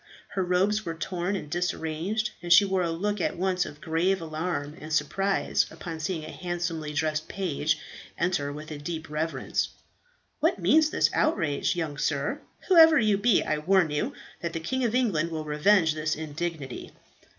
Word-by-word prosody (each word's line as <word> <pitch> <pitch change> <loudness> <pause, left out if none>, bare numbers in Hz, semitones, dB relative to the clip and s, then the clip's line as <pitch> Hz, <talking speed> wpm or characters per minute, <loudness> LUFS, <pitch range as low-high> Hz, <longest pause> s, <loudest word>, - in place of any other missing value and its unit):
Her 195 - -2
robes 190 +4 +2
were 165 -3 -4
torn 180 +3 -2
and 185 - -5
disarranged, 175 +5 -2
and 175 0 -5
she 185 +4 +8
wore 190 -1 +1
a 170 - 0
look 200 +4 -1
at - - -1
once 185 0 0
of 145 - -10
grave 175 +4 +1
alarm 155 -2 -3
and 155 +1 -8
surprise 195 +5 +1
upon 165 -3 -7
seeing 160 0 -3
a 155 - -7
handsomely 170 -3 -3
dressed 155 +1 -1
page 160 -5 -1 0.4
enter 170 -5 0
with 155 +2 -8
a 150 - -6
deep 160 +1 -5
reverence. 160 +2 -1 0.7
"What - - +2
means 315 -1 +4
this - - +2
outrage, 165 - +1
young 155 -5 -3
sir? - - -1 0.3
Whoever 325 -4 +8
you 215 -5 +3
be, 205 +1 +3
I 155 - -1
warn 175 0 +3
you 210 - -1 0.3
that 170 -2 -3
the 165 - -2
King 260 +11 -2
of 230 0 0
England 190 -11 +1
will 160 -2 -4
revenge 160 +3 +3
this 155 0 -1
indignity." 155 -3 -5
170 Hz, 175 wpm, -27 LUFS, 155-195 Hz, 0.7 s, she